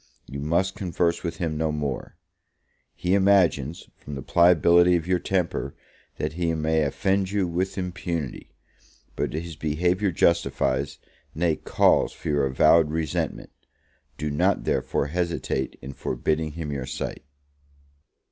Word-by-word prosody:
You 70 - -7
must 85 +6 0
converse 85 -2 -1
with 85 -1 -3
him 80 -3 -2
no 80 0 0
more: 75 -3 -4 0.8
he 90 - -1
imagines, 95 -7 +2
from 75 - -9
the 70 - -6
pliability 85 +1 +5
of 85 -2 -1
your 90 0 +1
temper, 85 -8 -1 0.4
that 75 +1 -2
he 85 -1 -1
may 80 0 +1
offend 95 +6 0
you 100 -2 0
with 90 +4 -2
impunity; 85 -5 -4 0.6
but - - -1
his 80 +1 -5
behaviour 90 +7 0
justifies, 80 -5 +1 0.4
nay, 80 0 +1
calls - - +2
for - - -6
your 70 -2 +2
avowed 75 +4 +4
resentment; 80 -2 -2 0.7
do 75 -1 -3
not, 70 - +1
therefore, - - 0
hesitate 85 -4 -2
in 70 - -7
forbidding 75 +5 -2
him 80 -2 -5
your 70 -2 -4
sight. - - -5
80 Hz, 135 wpm, -25 LUFS, 75-90 Hz, 0.8 s, pliability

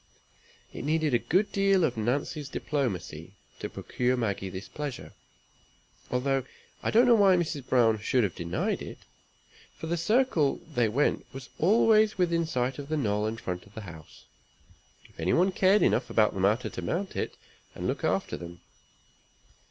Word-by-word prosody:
It - - -6
needed 155 -1 +1
a 120 - +4
good 190 - +1
deal 195 -2 +3
of 130 -6 +1
Nancy's 135 +5 -2
diplomacy 95 - -3 0.2
to - - -4
procure 125 +1 -1
Maggie 100 -5 -2
this 95 +1 -7
pleasure; 145 +4 -6 1.0
although 135 +1 0 0.4
I - - -1
don't 235 +3 +5
know 245 - +6
why 200 -4 +6
Mrs. 155 -6 -2
Browne 115 -4 +4
should 125 +3 +1
have 95 -5 -1
denied 85 +1 -2
it, - - -8 0.8
for - - -7
the 170 +2 -1
circle 175 - +2
they 120 -5 +2
went 140 +7 0
was 130 -2 -9
always 215 +3 +4
within 170 -2 +1
sight 130 -2 -1
of 140 0 -7
the 155 - 0
knoll 105 -5 0
in 110 +1 -3
front 90 -3 -5
of 100 - -21
the 110 - -6
house, 85 -6 -12 0.8
if - - -25
any 85 +3 +1
one 185 +3 +3
cared 190 +2 +4
enough - - +2
about 110 -2 +3
the - - -5
matter 105 +6 +1
to - - -6
mount 190 +3 -3
it, - - -3 0.4
and - - -5
look - - -2
after - - 0
them. 85 0 -9
135 Hz, 170 wpm, -28 LUFS, 105-170 Hz, 1.0 s, know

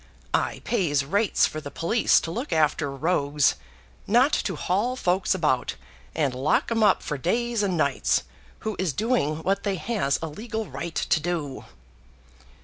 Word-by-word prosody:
I - - 0
pays 150 - +1
rates 200 +7 +2
for 155 - -4
the 145 - -7
police 195 +10 +2
to 165 - -5
look 245 - -4
after 155 -1 +2
rogues, 145 0 +1 0.5
not 250 +7 +4
to 190 - -1
haul 205 +11 0
folks 190 -4 +1
about 140 -8 0 0.4
and 145 -5 +1
lock 130 - +1
'em 225 -1 +1
up 205 -3 +4
for 150 -3 -3
days 235 - 0
and 190 -4 0
nights, 140 -4 +1 0.4
who 215 -1 -3
is 180 -6 0
doing 160 - 0
what 195 +1 +1
they 200 -2 -1
has 175 - 0
a - - -1
legal 220 +7 -5
right 170 -3 -6
to 160 - +1
do." 155 -4 -3
175 Hz, 160 wpm, -25 LUFS, 150-215 Hz, 0.5 s, not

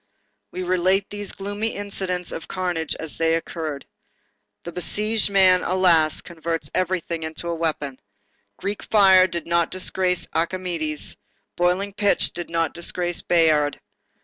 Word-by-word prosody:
We 185 - -5
relate 185 +2 +1
these 205 -1 -3
gloomy 205 +3 -3
incidents 190 -3 -3
of 165 - -6
carnage 175 -4 -2
as 160 -2 -6
they 165 0 +3
occurred. 160 -3 -4 0.8
The 170 - -6
besieged 210 +5 0
man, 190 -2 +5
alas! 175 -4 +3
converts 165 -1 -3
everything 180 -2 -1
into 160 +2 -4
a 170 - -1
weapon. 155 -5 -2 0.6
Greek 200 +1 -3
fire 190 -3 +6
did 170 -1 -4
not 170 0 +1
disgrace 185 -1 0
Archimedes, 170 -3 -2 0.4
boiling 180 +3 +1
pitch 205 0 +2
did 175 -1 -6
not 165 -2 0
disgrace 175 0 -2
Bayard. 155 -4 +3
175 Hz, 130 wpm, -23 LUFS, 165-190 Hz, 0.8 s, fire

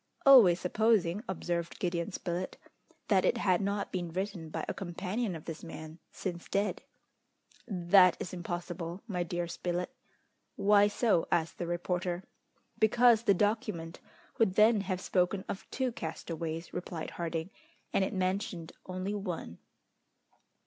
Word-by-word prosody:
"Always 225 -11 +8
supposing," 205 -1 +2
observed 170 -2 -2
Gideon 175 +1 -1
Spilett, 180 0 -4 0.5
"that - - +4
it - - +2
had 185 -2 +2
not 200 +1 -1
been 175 -2 -2
written 185 -2 -4
by - - -4
a - - -2
companion 190 +3 -3
of 160 - -9
this 165 -1 -6
man, 160 -1 -8
since 175 -3 -5
dead." 200 +1 0 0.9
"That 180 -2 +5
is 185 - -5
impossible, 175 0 -5
my 180 -5 -2
dear 175 0 -2
Spilett." 175 +1 -3 0.6
"Why 205 0 +5
so?" 205 -4 +2
asked 165 -1 0
the 175 - -2
reporter. 175 +1 -2 0.6
"Because 230 +1 +5
the 205 -4 +4
document 205 -5 -1 0.4
would 205 -5 +3
then 215 0 +5
have 185 -1 -3
spoken 190 +1 +1
of 195 - -6
two 260 -1 -1
castaways," 165 -3 -5
replied 175 -2 -5
Harding, 165 +1 -3 0.4
"and 195 - +3
it - - -1
mentioned 185 -3 -2 0.2
only 185 +2 -3
one." 180 - -5
180 Hz, 135 wpm, -31 LUFS, 170-205 Hz, 0.9 s, Always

